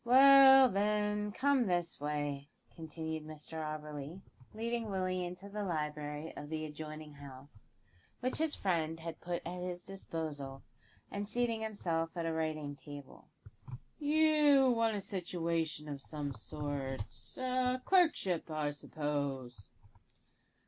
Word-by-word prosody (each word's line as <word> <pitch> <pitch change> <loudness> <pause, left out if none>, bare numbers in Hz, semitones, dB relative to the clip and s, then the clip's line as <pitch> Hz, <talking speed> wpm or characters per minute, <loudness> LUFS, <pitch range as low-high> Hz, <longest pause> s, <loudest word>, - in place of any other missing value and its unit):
"Well, 270 +1 +9
then, 210 0 +1
come 265 +1 +2
this 175 -2 0
way," 145 -1 -2 0.3
continued 160 -1 -5
Mr 155 +1 -7
Auberly, 150 +2 -6 0.3
leading 230 0 -2
Willie 185 -2 0
into 180 +3 -6
the 205 +1 -4
library 150 -3 -3
of 145 - -7
the 155 0 -2
adjoining 155 0 -7
house, 140 -4 -12 0.5
which 255 +1 -1
his 320 -1 +1
friend 165 -4 0
had 165 0 -6
put 175 0 -3
at 180 +1 -4
his 180 -1 -4
disposal, 155 -8 -5 0.5
and 205 0 -3
seating 235 -2 0
himself 170 -6 -2
at 170 - -1
a 165 - 0
writing 155 -2 -2
table. 145 -1 -11 0.7
"You 295 -3 +5
want 230 -2 +2
a 205 - -2
situation 170 -5 -2
of 140 -2 -5
some 145 -1 -4
sort 140 +1 -4 0.3
a 255 0 +1
clerkship, 310 - +3
I 155 -2 -1
suppose?" 140 -6 -3
165 Hz, 125 wpm, -34 LUFS, 150-210 Hz, 0.7 s, Well